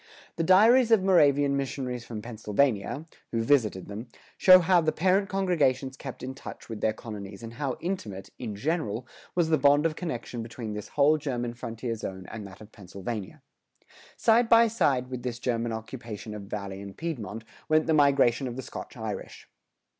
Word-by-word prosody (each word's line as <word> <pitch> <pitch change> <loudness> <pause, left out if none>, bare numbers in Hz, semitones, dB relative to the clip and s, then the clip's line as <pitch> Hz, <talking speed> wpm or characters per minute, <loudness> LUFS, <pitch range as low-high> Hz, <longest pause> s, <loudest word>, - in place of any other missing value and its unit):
The 165 - -1
diaries 225 +8 +6
of 225 -4 +5
Moravian 145 -7 +4
missionaries 130 -3 -3
from 110 -3 -7
Pennsylvania, 115 +4 0 0.3
who 115 -1 0
visited 115 -8 +2
them, 105 +4 -7 0.3
show 185 -1 +8
how 180 0 +4
the 155 -1 +1
parent 190 +4 +2
congregations 145 -9 +1
kept 130 -2 -8
in 130 +1 -4
touch 135 - -10
with 110 -2 -6
their 110 - +2
colonies[102:4] 105 -2 -8
and 115 0 -7
how 135 0 -3
intimate, 115 - -4
in 110 -5 -5
general, 120 -2 -2 0.3
was 170 -2 +2
the 155 - +3
bond 145 +2 +5
of 160 -1 +1
connection 125 -8 -4
between 115 -1 -6
this 105 -1 -6
whole 150 +2 +3
German 120 -5 -3
frontier 115 0 -5
zone 95 -4 -6
and 110 -3 -7
that 95 +2 -14
of 110 0 -13
Pennsylvania. 100 +1 -7 0.7
Side 230 +1 +4
by 230 0 +7
side 140 - +1
with 125 -1 -4
this 120 -1 -4
German 120 -2 -1
occupation 110 -1 -7
of 100 -2 -8
Valley 100 -2 -5
and 100 -1 -9
Piedmont, 115 - -5 0.3
went 155 0 +4
the 160 - +2
migration 140 -4 +4
of 120 - -5
the 130 - -5
Scotch - - -8
Irish. - - -6
125 Hz, 175 wpm, -27 LUFS, 110-155 Hz, 0.7 s, show